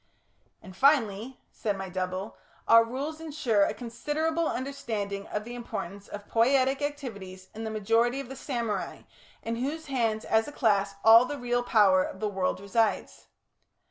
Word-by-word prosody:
"And 190 -2 -12
finally," 245 -2 +2
said 205 -3 -2
my 195 0 -5
double, 185 +2 -4 0.3
"our 230 0 +8
Rules 280 +7 -5
ensure 290 -9 0
a - - -2
considerable 310 +8 -2
understanding 220 -7 -4
of 210 - -3
the 240 +2 -8
importance 200 -5 -6
of 205 0 -9
poietic 265 +4 +2
activities 200 -11 -6
in 225 +1 -6
the - - -3
majority 225 +4 +1
of 275 - -6
the 270 - -8
samurai, 235 -8 -3 0.4
in 230 0 -3
whose 295 +6 -3
hands 230 -5 -1
as 220 0 +2
a - - -6
class 200 -7 +1
all 225 +2 +9
the 290 +3 -5
real 245 -1 0
power 205 -6 +4
of 190 - -7
the 215 - -1
world 190 -3 -1
resides." 210 +3 -1
230 Hz, 160 wpm, -28 LUFS, 200-265 Hz, 0.4 s, all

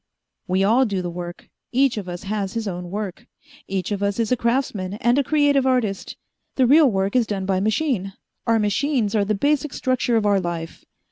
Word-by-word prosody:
"We 190 +1 +1
all 235 +6 +4
do 195 -3 -2
the 175 - -3
work. 175 0 -7 0.2
Each 265 0 +3
of 200 -4 -5
us 175 +2 -6
has 200 -1 -3
his 225 -2 -3
own 180 -2 -5
work. 210 +3 -5 0.4
Each 190 0 -3
of 200 -1 -2
us 200 -1 0
is 230 -1 0
a - - +5
craftsman 235 -6 -1
and 240 +5 +2
a - - +2
creative 285 -2 +2
artist. 230 -7 -1 0.4
The 260 - +3
real 290 +3 +6
work 195 0 -1
is 240 -3 +3
done 195 -2 -3
by 190 -1 +1
machine 215 -2 0 0.3
our 230 0 +4
machines 220 +1 0
are 210 -2 +2
the 215 +1 0
basic 285 +5 0
structure 255 -2 0
of 220 -2 +2
our 200 -1 +3
life. 170 -2 -5
210 Hz, 205 wpm, -22 LUFS, 195-255 Hz, 0.4 s, real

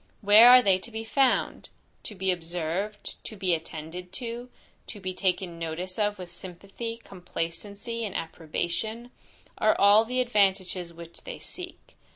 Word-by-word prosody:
Where 215 +3 +9
are 250 0 +9
they 190 -2 +4
to 235 - -8
be 225 -1 -5
found? 260 +3 +1 0.4
"To 210 - -6
be 190 0 +1
observed, 175 +4 -4
to 220 - -7
be 190 -3 +1
attended 165 +2 -5
to, 240 0 -5 0.4
to 210 - -8
be 185 -1 -4
taken 180 -2 -1
notice 175 +4 -4
of 210 0 +1
with 180 -2 -8
sympathy, 195 +6 -7
complacency, 200 +5 -5
and 205 -4 -4
approbation, 175 +9 -4 0.5
are 215 - +3
all 205 +2 +7
the 250 +3 -2
advantages 190 -7 +1
which 170 0 -12
they - - -7
seek." 360 -1 -8
195 Hz, 150 wpm, -27 LUFS, 175-225 Hz, 0.5 s, Where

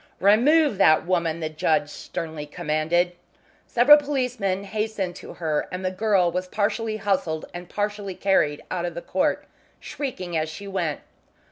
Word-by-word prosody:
"Remove 245 +5 +4
that 155 0 +5
woman," 170 -2 0
the 155 - -2
judge 155 -1 +1
sternly 150 +1 -6
commanded. 165 +2 0 0.6
Several 260 +5 +7
policemen 250 -9 -1
hastened 210 -3 -3
to - - -10
her, 155 -3 -1
and 185 +1 -4
the 185 - 0
girl 185 -3 +2
was 180 +1 -3
partly 215 +2 -1
hustled 185 -6 -1
and 175 0 -8
partly 205 -2 -3
carried 150 -7 +1
out 175 -1 -1
of 170 0 -6
court, 185 - 0 0.3
shrieking 185 - -5
as 155 0 0
she 180 +6 -8
went. 175 -6 -2
185 Hz, 145 wpm, -24 LUFS, 165-210 Hz, 0.6 s, Several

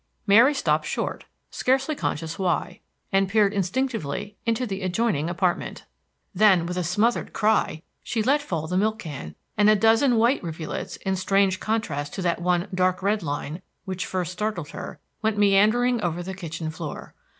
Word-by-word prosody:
Mary 230 +8 +6
stopped 275 - +1
short, - - -3 0.3
scarcely 265 +4 +1
conscious 165 - -3
why, 180 -1 -1 0.3
and 195 0 +2
peered 210 -1 +3
instinctively 205 - -2
into 230 +2 +1
the 195 -3 -4
adjoining 185 -4 0
apartment. 175 0 -1 0.5
Then, 190 -3 +5
with 180 +1 -3
a 180 - -1
smothered 210 +8 0
cry, 215 -7 +1 0.2
she 225 -2 -2
let 280 +5 +3
fall 165 - -3
the 180 +3 -1
milk 215 +3 +1
can, 140 - -7 0.2
and 210 0 +6
a 215 - +6
dozen 225 +4 +4
white 235 +4 +3
rivulets, 160 -2 -5
in 190 0 +1
strange 195 0 +2
contrast 155 -10 -2
to 190 - -3
that 170 0 0
one 180 +1 +1
dark 185 0 +1
red 205 +2 +1
line 150 +2 -4 0.2
which 185 -2 -4
first 180 -2 -2
startled 180 -5 -3
her, - - -8 0.2
went 220 -1 0
meandering 215 +4 +4
over 175 -1 -2
the 190 +2 -5
kitchen 165 -3 -5
floor. 155 -2 -7
195 Hz, 165 wpm, -25 LUFS, 175-220 Hz, 0.5 s, Mary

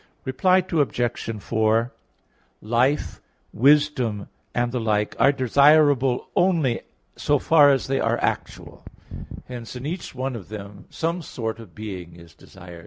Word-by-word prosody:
Reply 185 +8 +2
Obj. 120 - -1
4: 110 +1 +1 0.7
Life, 120 +6 0 0.3
wisdom, 130 -6 +2 0.2
and 120 0 -1
the 125 - -2
like, 105 -2 -1
are 140 - +5
desirable 140 0 +3
only 165 -10 +2 0.3
so 145 - +1
far 145 0 +5
as 135 -2 +2
they 135 0 -1
are - - +1
actual. - - -4 0.6
Hence, 120 -1 -8
in 125 +2 -7
each 170 -1 -5
one 130 0 -3
of 100 -6 -9
them 100 -2 -9
some 165 +2 -2
sort 115 -6 -5
of 110 -7 -13
being 95 -6 -8
is 85 -1 -15
desired. 90 -2 -13
125 Hz, 135 wpm, -23 LUFS, 110-145 Hz, 0.7 s, are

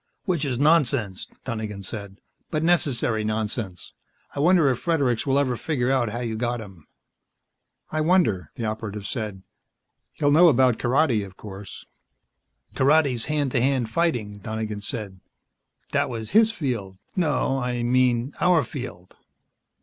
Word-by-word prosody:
"Which 170 -6 0
is 130 -3 -1
nonsense," 130 - +2 0.2
Donegan 110 -5 -4
said, 100 -1 -7 0.3
"but 155 0 -1
necessary 135 -10 +2
nonsense. 110 -3 -3 0.4
I - - -5
wonder 170 0 +5
if 125 - 0
Fredericks 140 -8 +1
will 135 0 +3
ever 130 -3 +1
figure 130 -2 -1
out 130 -4 +2
how 120 +3 -4
you 115 -2 -3
got 120 +1 -1
him." 95 -7 -12 1.0
"I 155 - 0
wonder," 155 - +2
the 115 - -4
Operative 110 -2 -4
said. 105 -5 -4 0.7
"He'll 145 -1 +1
know 170 +4 +7
about 130 -4 +3
karate, 125 -3 +2
of 95 -1 -11
course." 100 -2 -9 0.9
"Karate's 140 -4 +3
hand 145 -3 0
to 120 - +1
hand 130 -3 +1
fighting." 115 -11 0
Donegan 110 0 -4
said. 100 -3 -5 0.7
"That - - +1
was 115 -3 -5
his 220 +2 +5
field. 120 - -3 0.2
No, 150 -6 +1
I 125 -1 -2
mean 125 +1 +2
our 175 -4 +4
field. 120 - -8
120 Hz, 140 wpm, -24 LUFS, 110-145 Hz, 1.0 s, know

